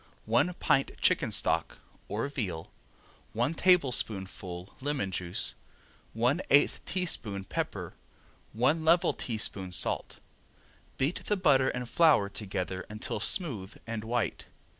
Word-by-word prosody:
One 120 +11 +2
pint 135 -5 +2
chicken - - +2
stock - - 0 0.3
(or 110 +6 -2
veal), 100 - -4 0.6
one 120 +7 +1
tablespoonful 100 - +1
lemon 135 -8 -1
juice, 90 -1 0 0.6
one 125 +9 +2
eighth 140 +1 +4
teaspoon 115 - 0
pepper, - - -4 0.6
one 135 +9 +2
level 170 +2 +4
teaspoon 105 -5 -3
salt. 90 - -1 0.8
Beat 140 +7 -1
the 210 - +1
butter 135 -8 +4
and 125 -1 -4
flour 145 -7 +4
together 95 -2 -4
until 105 0 -4
smooth 110 - -1
and 115 -1 -4
white. 115 -1 -2
115 Hz, 115 wpm, -30 LUFS, 100-145 Hz, 0.8 s, eighth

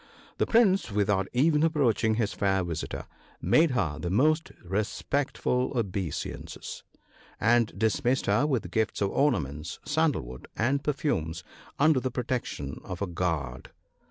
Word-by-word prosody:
The - - +2
Prince, 195 - +4
without 100 -2 +1
even 150 +4 +3
approaching 130 -8 +2
his 110 -2 0
fair 95 -1 +1
visitor, 85 -3 -4 0.3
made 155 - +4
her 85 - -1
the 85 - -3
most 155 - +2
respectful 125 +7 -1
obeisances, 95 - -4 0.6
and 115 0 +3
dismissed 120 +5 +1
her 145 - +3
with 115 - -1
gifts 110 +2 0
of 100 - +1
ornaments, 75 - 0
sandal 150 - +1
wood, 65 +1 -10
and 140 +5 +1
perfumes, 90 - -1 0.3
under 155 -1 +4
the 130 - -2
protection 120 - -3
of 90 +2 -5
a - - +1
guard. 80 -8 -3
110 Hz, 130 wpm, -28 LUFS, 90-140 Hz, 0.6 s, Prince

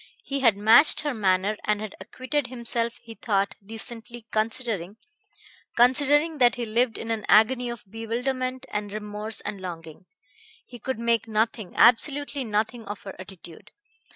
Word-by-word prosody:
He 275 0 -3
had 230 -6 +4
matched 225 +8 +6
her 295 -2 -2
manner 200 -1 +1
and 210 -1 0
had 215 -1 -6
acquitted 255 +7 -3
himself, 235 -1 -2
he 230 - -10
thought, 200 -3 0
decently, 225 +2 -9
considering... 215 -3 -1 0.8
considering 290 +5 +3
that 245 -1 +5
he 245 -1 -3
lived 230 +2 0
in 230 - -5
an 220 -2 -2
agony 245 +3 +4
of 235 -2 -7
bewilderment 255 +4 -3
and 205 -1 -3
remorse 210 +1 -5
and 200 - -6
longing. 170 -1 -8 0.6
He 245 - -12
could 260 +3 -3
make 230 -1 0
nothing, 220 -2 -1
absolutely 280 +3 +3
nothing, 220 +1 -2
of 205 0 -7
her 195 - -8
attitude. 185 +1 -12
225 Hz, 150 wpm, -25 LUFS, 210-250 Hz, 0.8 s, matched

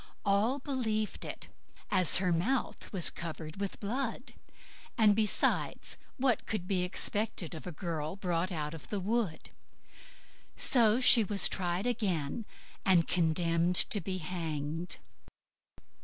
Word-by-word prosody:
All 205 +7 +2
believed 235 -6 -3
it, - - -6 0.4
as 185 -4 +7
her 180 -1 +1
mouth 235 +11 -2
was 185 -5 +4
covered 160 0 -7
with 200 -1 -4
blood; 245 +4 -4 0.6
and, 215 -3 +5
besides, 215 -1 +1 0.2
what 260 -3 +1
would 185 -5 -3
be 185 -2 0
expected 180 0 0
of 160 +2 -9
a - - -4
girl 160 -1 -5
brought 180 -1 -2
out 150 -3 -4
of 160 - -10
the 205 - -2
wood? 200 -4 -2 1.0
So 235 -3 +3
she 245 -3 +7
was 200 0 +4
tried 180 +1 -2
again, 205 -5 -2 0.4
and 180 -4 +3
condemned 170 +1 +1
to 205 +3 +3
be 190 -1 -4
hanged. 165 -1 -4
185 Hz, 125 wpm, -31 LUFS, 170-215 Hz, 1.0 s, as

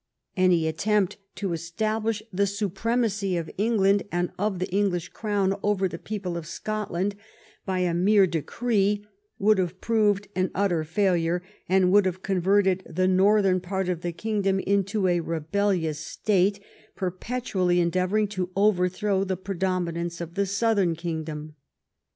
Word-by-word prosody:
Any 180 -4 +3
attempt 195 +4 +1 0.2
to 195 -4 -2
establish 215 +6 -2
the 200 +2 +2
so 200 +1 -2
premacy 205 -2 0
of 165 - -6
England 200 -2 +3
and 175 0 -1
of 205 -1 0
the 185 - -2
English 195 -4 0
crown 200 -3 0
over 205 -2 +1
the 170 -2 -7
people 195 -5 -4
of 165 -2 -6
Scotland 200 +1 -3 0.5
by 185 -1 0
a 175 -2 +1
mere 195 +3 +4
decree 205 +4 0 0.3
would 210 0 +3
have 180 0 -2
proved 210 -3 +1
an 185 0 +1
utter 180 -5 +1
failure, 175 0 +1 0.3
and 185 -1 +4
would 200 -1 +5
have 185 +1 -4
converted 190 0 +2
the 185 +2 +1
north 195 +3 +4
em 185 -1 +2
part 190 0 -2
of 175 -2 -2
the 175 - -2
kingdom 195 +1 0
into 200 +1 0
a 175 -1 +2
rebellious 165 0 -1
state 195 +4 +1 0.4
per 185 -2 -2
petually 185 -3 -1
endeavoring 185 +4 +1
to 185 -3 -3
overthrow 195 0 +2
the 190 -1 -2
predominance 175 -3 -2
of 170 -1 -6
the 200 +1 0
southern 200 -3 +1
kingdom. 160 -2 -5
190 Hz, 150 wpm, -26 LUFS, 175-205 Hz, 0.5 s, would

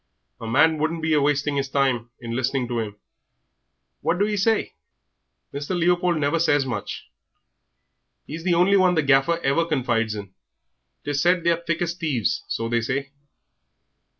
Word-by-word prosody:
A 115 - -7
man 155 +7 +3
wouldn't 160 +1 -2
be 160 0 +1
a 150 - +3
wasting 145 0 +1
'is 135 -1 -1
time 130 -4 0
in 115 -1 -5
listening 130 0 -1
to 120 -1 -1
'im. 105 -2 -6 1.1
What 175 - 0
do 200 - +2
'e 210 0 -1
say?" 220 +3 +1 0.8
"Mr. 145 +6 -3
Leopold 175 0 +2
never 150 +2 +1
says 145 -4 +2
much. 115 -6 -5 1.2
He's 160 +2 -7
the 175 -1 +2
only 180 +4 +4
one 185 -2 +4
the 160 - +2
Gaffer 140 +4 +3
ever 140 +5 +2
confides 120 -8 0
in. 100 -2 -8 0.7
'Tis 145 -1 -1
said 175 0 +3
they 170 - +3
are 165 - 0
as 170 - -20
thick 170 +1 0
as 170 0 -2
thieves, 155 - -1
so 115 - -2
they 120 0 0
say. 135 +4 -3
145 Hz, 175 wpm, -23 LUFS, 130-170 Hz, 1.2 s, only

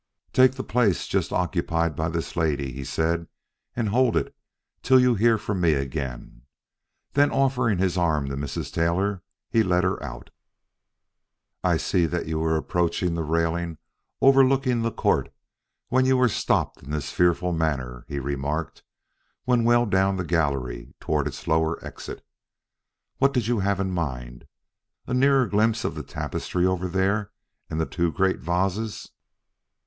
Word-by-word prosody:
"Take 130 0 +6
the 130 0 -5
place 110 -6 +1
just - - -1
occupied 85 -3 0
by 80 +1 -1
this 85 0 -4
lady," 75 -5 0
he 70 +2 -6
said, 80 +4 -1 0.5
"and 115 -4 -1
hold 125 +2 +3
it - - -2 0.5
till 130 0 +5
you 125 -1 +4
hear 115 +1 +3
from 100 -3 -3
me 85 -3 +4
again." 65 -3 -4 0.7
Then 145 +1 +4
offering 130 -6 +1
his 90 0 +1
arm 75 -5 +1
to 70 - -3
Mrs. 70 +1 -5
Taylor, 90 +4 0 0.3
he 115 - +4
led 90 -3 +2
her 95 +1 0
out. - - -8 1.3
"I - - +3
see 85 -2 +1
that 85 +1 -2
you 80 0 -2
were 80 0 +1
approaching 85 +2 0
the 85 - -2
railing 85 +1 -1 0.4
overlooking 135 -2 +4
the 115 0 0
court - - 0 0.6
when 130 +1 +3
you 130 0 +4
were 125 0 +4
stopped - - 0
in 65 - -13
this 75 -2 -3
fearful 90 0 +2
manner," 70 -7 -2
he 70 -1 -5
remarked 70 +3 -3 0.6
when 125 -2 +3
well 120 +1 +4
down 95 -1 +2
the 90 - -2
gallery 70 -8 -1
toward 75 -2 0
its 75 - -8
lower 80 +1 +2
exit. - - -8 0.9
"What 140 0 +3
did 125 -5 0
you 120 -1 +1
have 100 0 0
in 95 -1 -1
mind? 65 -8 -4 0.6
A 125 - -4
nearer 135 0 +4
glimpse 110 +2 +1
of - - -1
the - - -5
tapestry 90 0 -3
over 95 0 0
there 100 +3 0 0.4
and 80 - -3
the 80 - +1
two 85 0 -1
great 95 +3 +1
vases?" 95 +6 -2
90 Hz, 160 wpm, -25 LUFS, 80-110 Hz, 1.3 s, Take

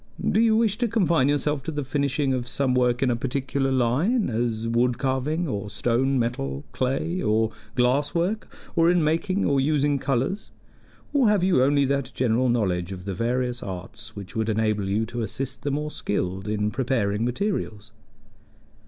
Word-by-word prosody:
Do - - +3
you 225 -1 +4
wish 220 -2 +1
to 240 - +2
confine 170 - +2
yourself 145 0 0
to 135 - -6
the 145 -1 -3
finishing 140 0 0
of 125 -1 -2
some 130 0 0
work 125 0 +2
in 130 - +2
a - - +1
particular 135 +2 -1
line 135 - +1
as 115 0 -1
wood 120 +1 +2
carving, 135 +6 -1
or 105 -5 -3
stone, 130 +5 +1
metal, 75 - -2
clay 135 +8 -1
or 110 +1 +2 0.2
glass 130 +5 +2
work; 190 +6 -1 0.2
or 165 0 +4
in 175 -2 +3
making 175 +6 +1
or 140 -1 +2
using 145 0 +2
colors? 135 - -1 0.6
or 270 -6 +4
have 205 -4 +2
you 185 -8 +4
only 140 +1 +3
that 140 -1 -1
general 125 0 +2
knowledge 95 -6 0
of 90 -1 -7
the 100 - -3
various 120 +4 -1
arts 95 -1 -8
which 100 -2 -9
would 110 0 0
enable 110 -2 0
you 105 +3 +1
to 120 +1 -5
assist 130 +4 -4
the 145 - -2
more 150 +2 -2
skilled 95 -4 -3
in 105 0 0
preparing 115 -5 0
materials?" 120 - -2
130 Hz, 175 wpm, -25 LUFS, 115-150 Hz, 0.6 s, you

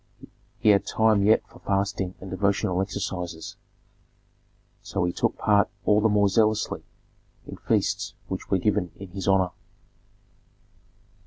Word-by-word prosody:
He - - +2
had 100 -1 +4
time 110 -2 +3
yet 105 +3 +4
for - - -17
fasting 100 -2 -1
and 95 -1 -9
devotional 95 -1 0
exercises; 90 -4 -4 1.3
so - - -2
he 90 0 0
took - - -1
part 105 -1 +3 0.2
all 105 0 +4
the 110 - +3
more 105 -1 +3
zealously 110 +1 +1 0.6
in - - -9
feasts - - -1
which 95 - -5
were 95 - +3
given 100 -1 0
in 100 -1 -10
his 95 +2 -6
honor. 95 -2 +3
100 Hz, 135 wpm, -25 LUFS, 95-105 Hz, 1.3 s, had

